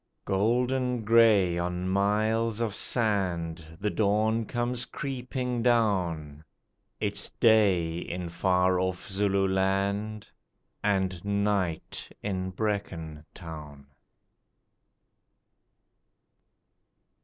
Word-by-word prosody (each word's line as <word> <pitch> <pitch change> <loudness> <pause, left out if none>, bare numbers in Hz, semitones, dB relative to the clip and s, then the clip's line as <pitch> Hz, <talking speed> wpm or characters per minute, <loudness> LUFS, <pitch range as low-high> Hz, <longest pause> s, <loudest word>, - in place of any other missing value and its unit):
_Golden 125 +4 +1
grey 105 -6 +5
on 90 +1 -2
miles 105 +3 +1
of 115 -3 -1
sand 85 -8 -1
The 105 +1 -1
dawn 110 +2 +1
comes 120 0 -1
creeping 125 -2 -3
down; 90 -11 +1 0.6
It's 105 -1 -1
day 95 -7 +3
in 90 0 -5
far 90 +1 +2
off 95 +1 -2
Zululand 100 +1 0 0.6
And 95 -3 0
night 100 -5 -1
in 95 -2 -2
Brecon 90 -6 -3
Town. 75 -5 -9
100 Hz, 75 wpm, -28 LUFS, 90-110 Hz, 0.6 s, grey